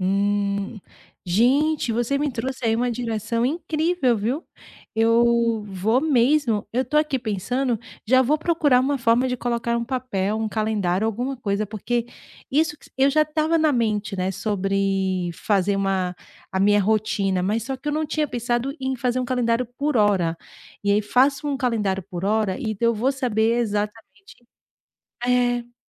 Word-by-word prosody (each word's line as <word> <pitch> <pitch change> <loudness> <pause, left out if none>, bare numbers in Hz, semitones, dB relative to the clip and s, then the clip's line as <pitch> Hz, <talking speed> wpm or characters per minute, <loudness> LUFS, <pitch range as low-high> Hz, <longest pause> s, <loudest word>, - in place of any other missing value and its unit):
Hum, 200 +2 0 0.4
gente 255 - +2
você 240 +4 0
me 295 +1 0
trouxe 255 +1 -4
aí 225 -1 +3
uma 245 +2 0
direção 230 0 -1
incrível, 315 -3 0
viu, 245 +11 -2 0.5
eu 230 0 +3
vou 205 +6 +1
mesmo. 260 -5 +2
Eu 250 +3 +1
estou 300 +3 +1
aqui 300 -3 +1
pensando, 240 +2 -1 0.3
já 260 +3 +4
vou 270 +4 +3
procurar 310 -5 +2
uma 275 +2 0
forma 235 +1 +2
de 250 - -1
colocar 235 -1 -1
um 235 - -2
papel, 235 -6 -2
um 220 0 -1
calendário, 215 -3 0
alguma 245 +5 -2
coisa, 210 -3 -1
porque 225 +3 -2 0.4
isso 300 +2 +1
que - - -19
eu 270 +1 +5
já 305 +2 +4
estava 310 +2 0
na 315 -1 +3
mente, 215 -5 -1
né. 185 +1 -1
Sobre 195 -2 -1
fazer 200 +2 0
uma 190 -2 -1 0.3
a 190 - -2
minha 205 +2 +4
rotina, 205 -2 +1
mas 210 +5 0
só 265 +2 -4
que 275 +3 -6
eu - - 0
não 310 +1 0
tinha 305 0 -1
pensado 240 +1 -2
em 265 0 -2
fazer 250 +1 0
um - - -1
calendário 245 -1 0
por 290 -1 0
hora 190 -6 +2 0.5
e 205 - +1
aí 205 +1 +4
faço 265 +7 +2
um 280 - -1
calendário 215 -7 0
por 180 -1 -4
hora, 210 -2 +1
então 230 -1 0
vou 245 +5 0
saber 230 -3 +1
exatamente 210 -2 -4 0.9
é. 245 -1 +1
230 Hz, 160 wpm, -23 LUFS, 205-260 Hz, 0.9 s, eu